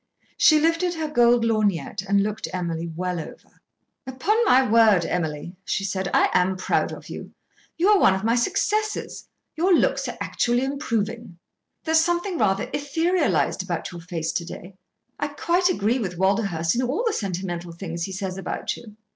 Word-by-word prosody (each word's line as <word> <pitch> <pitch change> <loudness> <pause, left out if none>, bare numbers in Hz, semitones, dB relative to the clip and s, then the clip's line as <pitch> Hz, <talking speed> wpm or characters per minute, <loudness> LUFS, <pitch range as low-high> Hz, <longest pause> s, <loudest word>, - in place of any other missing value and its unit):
She 310 -1 +5
lifted 330 +3 +1
her 320 -1 -2
gold 240 -5 +3
lorgnette 205 -5 0
and 200 0 +4
looked 210 +1 -3
Emily 170 -2 -3
well 180 0 -2
over. 160 - -11 0.5
"Upon 260 +12 0
my 260 -8 +5
word, 215 -5 +5
Emily," 165 0 -3
she 195 - -2
said, 190 -1 -2
"I - - +4
am 185 +1 +2
proud - - 0
of - - -9
you. - - -8 0.4
You 350 - +2
are 415 -2 +6
one 190 - +5
of 190 - -4
my 225 +1 +2
successes. 425 - -1 0.3
Your 355 +4 +1
looks - - +1
are - - -6
actually 240 +1 0
improving. 235 - -3 0.5
There's 320 0 +3
something 345 +1 0
rather 195 -3 +2
etherealised 325 +6 +1
about - - -4
your 175 -1 -9
face 165 -2 -3
to 170 - -2
day. 180 +2 -9 0.5
I 290 - 0
quite 345 +5 +1
agree 235 - +1
with 185 -6 -4
Walderhurst 190 -4 +1
in 245 - 0
all 265 - -1
the 450 - +1
sentimental 175 - -4
things 170 -1 -5
he 195 - -7
says 190 -1 -4
about - - -3
you." 215 -3 -13
215 Hz, 170 wpm, -24 LUFS, 180-295 Hz, 0.5 s, are